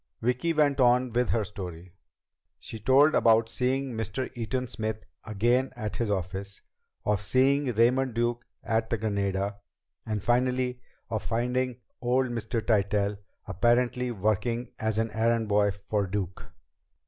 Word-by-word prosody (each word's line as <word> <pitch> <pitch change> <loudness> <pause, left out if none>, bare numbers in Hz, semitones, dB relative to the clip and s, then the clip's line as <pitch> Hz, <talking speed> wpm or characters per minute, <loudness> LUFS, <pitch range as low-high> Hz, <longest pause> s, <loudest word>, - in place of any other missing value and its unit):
Vicki 125 +8 0
went 150 -3 +2
on 125 0 +4
with 120 +2 +1
her 115 - +1
story. 90 -3 -8 0.6
She 110 - -8
told 135 +7 +5
about 115 0 +4
seeing 130 +2 -1
Mr. 115 +4 -3
Eaton 125 +2 -2
Smith 110 -1 -4 0.2
again 120 +5 +1
at 110 -3 -4
his 115 -3 -1
office; 95 +1 -4 0.4
of 105 -1 +1
seeing 135 +5 +2
Raymond 125 +2 +3
Duke 120 0 0 0.2
at 110 0 0
the 115 - 0
Granada; 100 -1 -1 0.5
and 105 -3 -3
finally, 125 +1 +1 0.3
of 110 - -1
finding 125 +2 -1 0.2
old 125 +1 +1
Mr. 115 -1 -3
Tytell 100 -2 +1 0.3
apparently 125 +4 +1
working 115 +3 -1
as 110 -1 -1
an 115 0 0
errand 115 0 +1
boy 105 0 +3
for 100 +1 -2
Duke. 95 -1 -4
115 Hz, 135 wpm, -28 LUFS, 105-125 Hz, 0.6 s, told